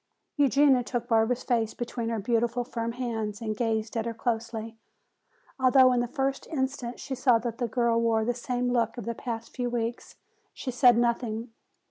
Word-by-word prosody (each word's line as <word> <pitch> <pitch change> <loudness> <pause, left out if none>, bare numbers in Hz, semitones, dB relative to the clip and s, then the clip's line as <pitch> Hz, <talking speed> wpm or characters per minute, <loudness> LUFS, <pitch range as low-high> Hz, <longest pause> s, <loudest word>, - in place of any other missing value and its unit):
Eugenia 280 -2 +4
took 240 0 -3
Barbara's 230 +1 +2
face 230 -3 0
between 240 -1 -3
her 230 - -1
beautiful, 235 +3 0
firm 230 -1 -4
hands 225 -4 -3
and 215 -2 -3
gazed 220 0 -1
at 225 0 -1
her 230 - -4
closely. 225 -1 -3 0.8
Although 260 0 +6
in 245 - +2
the 240 - 0
first 270 +1 -2
instant 265 -4 -3
she 270 - -5
saw 250 -2 +4
that 230 +1 -5
the 240 - 0
girl 230 0 +1
wore 225 -1 +2
the 245 - +1
same 245 0 -2
look 235 -1 0
of 240 - -6
the 235 - -2
past 230 -1 -6
few 245 -1 -1
weeks, 235 0 -3 0.4
she 255 - -4
said 245 -1 +5
nothing. 235 -1 0
235 Hz, 180 wpm, -27 LUFS, 230-250 Hz, 0.8 s, Although